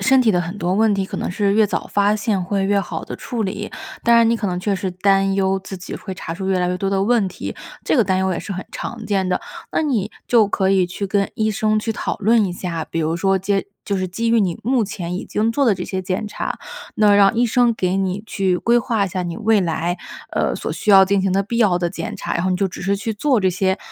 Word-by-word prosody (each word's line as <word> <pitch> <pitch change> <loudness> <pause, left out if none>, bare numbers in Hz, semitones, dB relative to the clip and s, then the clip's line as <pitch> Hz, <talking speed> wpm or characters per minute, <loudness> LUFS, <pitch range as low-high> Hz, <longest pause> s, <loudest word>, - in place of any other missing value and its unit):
身 265 0 +4
体 230 -3 +4
的 180 - +2
很 175 +4 -5
多 180 +2 0
问 220 0 +3
题 195 -1 -1
可 - - -6
能 - - -2
是 200 +2 +1
越 215 -1 +4
早 - - -3
发 205 +1 +3
现 205 -3 -1
会 195 +1 -1
越 200 0 +2
好 - - -4
地 - - -7
处 235 -3 -4
理， 205 +2 -4 0.3
当 235 0 +4
然 230 -1 +6
你 230 - +2
可 210 - -2
能 180 -1 -2
确 200 0 0
实 185 0 -3
担 195 +1 +2
忧 195 0 +1
自 190 0 -8
己 180 - -7
会 190 - -7
查 165 -2 -6
出 190 +1 -5
越 190 -1 +2
来 180 0 +1
越 180 - -1
多 195 +1 -2
的 195 0 +1
问 225 -2 +2
题， 185 - -6 0.3
这 - - +2
个 235 - +4
担 185 0 +1
忧 190 0 +1
也 - - -3
是 200 - -5
很 185 - -6
常 230 -2 -6
见 195 -2 0
的， - - 0 0.3
那 - - +1
你 230 -9 0 0.2
就 225 -4 +5
可 190 -1 0
以 190 -2 +3
去 195 +3 -4
跟 200 0 0
医 220 0 0
生 215 0 +1
去 225 +1 -2
讨 - - -3
论 220 +1 +3
一 180 - -2
下， 170 -3 -4
比 165 - -3
如 160 +1 0
说 195 +2 +2
接 195 +1 -1 0.2
就 200 - 0
是 185 0 -1
基 230 +6 -2
于 230 -1 +4
你 180 -4 0
目 250 -1 +2
前 180 -4 -5
已 185 - -4
经 220 +2 0
做 280 +2 +2
的 225 - +4
这 - - -6
些 190 -1 -3
检 185 +3 -2
查。 - - -4 0.4
那 210 -1 +5
让 200 +1 +5
医 240 +1 +3
生 240 +1 +3
给 185 -2 0
你 190 0 -1
去 190 -4 0
规 240 +1 +3
划 225 -5 0
一 - - -3
下 185 -1 -3
你 170 -1 -4
未 220 -2 +3
来， 170 +1 -1 0.4
呃， - - 0
所 - - -4
需 210 - -1
要 195 -1 +8
进 195 0 +1
行 195 - +1
的 195 - +2
必 230 +3 -3
要 190 -6 +3
的 175 - 0
检 170 -2 -5
查， - - -3
然 170 - 0
后 185 - 0
你 185 - +1
就 195 0 +1
只 185 - -8
是 200 +2 +1
去 215 +2 -3
做 265 +3 +2
这 190 - +3
些 190 +1 0
195 Hz, 300 characters per minute, -20 LUFS, 185-215 Hz, 0.4 s, 要